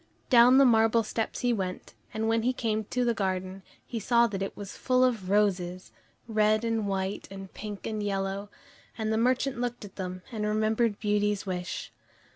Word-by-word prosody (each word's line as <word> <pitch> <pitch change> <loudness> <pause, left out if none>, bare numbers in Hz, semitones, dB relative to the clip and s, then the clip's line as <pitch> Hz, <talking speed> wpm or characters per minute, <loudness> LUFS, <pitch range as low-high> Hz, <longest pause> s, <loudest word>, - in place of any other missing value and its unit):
Down 245 +1 +7
the 275 - +7
marble 225 -1 +4
steps 220 +1 -3
he 245 -1 +2
went, 185 -4 -4 0.2
and 220 +1 -2
when 225 0 +2
he 250 +3 +1
came 220 -3 -1
to 250 +4 -1
the 235 - +2
garden, 190 -2 -2 0.2
he 235 - -4
saw 235 +3 +4
that 200 -4 -3
it 195 - -4
was 200 -2 -7
full 255 -1 +2
of 225 -8 0
roses, 185 -3 0 0.4
red 215 0 +2
and 225 -2 0
white 195 0 -2
and 195 -1 -9
pink 205 -2 -7
and 215 -1 -3
yellow, 195 0 -2 0.5
and 220 -1 -1
the - - +1
merchant 255 +1 +1
looked 245 -3 -3
at 195 - -14
them, 185 -1 -5
and 220 -3 -3
remembered 215 +1 +1
Beauty's 210 -1 0
wish. 180 -2 -4
215 Hz, 185 wpm, -28 LUFS, 195-230 Hz, 0.5 s, Down